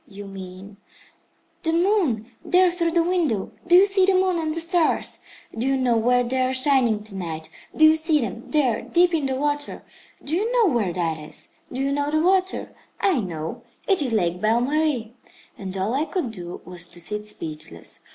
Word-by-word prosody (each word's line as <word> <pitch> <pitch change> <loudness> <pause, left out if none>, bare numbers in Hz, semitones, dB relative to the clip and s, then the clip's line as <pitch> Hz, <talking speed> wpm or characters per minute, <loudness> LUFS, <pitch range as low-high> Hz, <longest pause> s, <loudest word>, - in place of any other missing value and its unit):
"You 200 0 -10
mean 195 +1 -10 0.4
" - - -41
"The 325 - 0
moon 340 - +2 0.2
there 365 0 +4
through 340 -1 0
the 340 -1 +3
window? 330 - 0 0.2
Do 345 - +6
you 375 +2 +8
see 390 -1 +3
the 390 - +4
moon 370 -2 +2
and 315 -1 -1
the 325 - -2
stars? 335 0 +1 0.4
Do 230 +4 -1
you 270 0 +2
know 250 -3 +2
where 245 +2 +3
they 255 +2 -1
are 255 0 +1
shining 255 -5 +3
to 210 -2 -5
night? 160 -4 -5 0.3
Do 315 - +7
you 310 0 +7
see 315 -1 +2
them, 230 -1 -5
there, 270 -8 +1
deep 355 0 +2
in 305 -4 +1
the 265 - -1
water? 290 +1 -2 0.4
Do 310 - -2
you 430 +6 0
know 450 - +3
where 210 -7 +1
that 165 -3 -2
is? 150 0 -8 0.2
Do 255 - -3
you 275 - 0
know 285 +1 0
the 310 +1 +1
water? 375 +2 +1 0.3
I 375 -9 +2
know. 165 -6 -5 0.3
It 385 -5 +3
is 260 -4 -1
Lake 180 -5 0
Belle 225 +2 +2
Marie." 275 -4 0 0.4
And 195 -1 -6
all 195 +5 -1
I 285 +4 +1
could 330 - -3
do 175 -4 -8
was 175 -1 -3
to 175 - -12
sit 210 +4 -4
speechless. 155 - -7
260 Hz, 205 wpm, -23 LUFS, 205-330 Hz, 0.4 s, you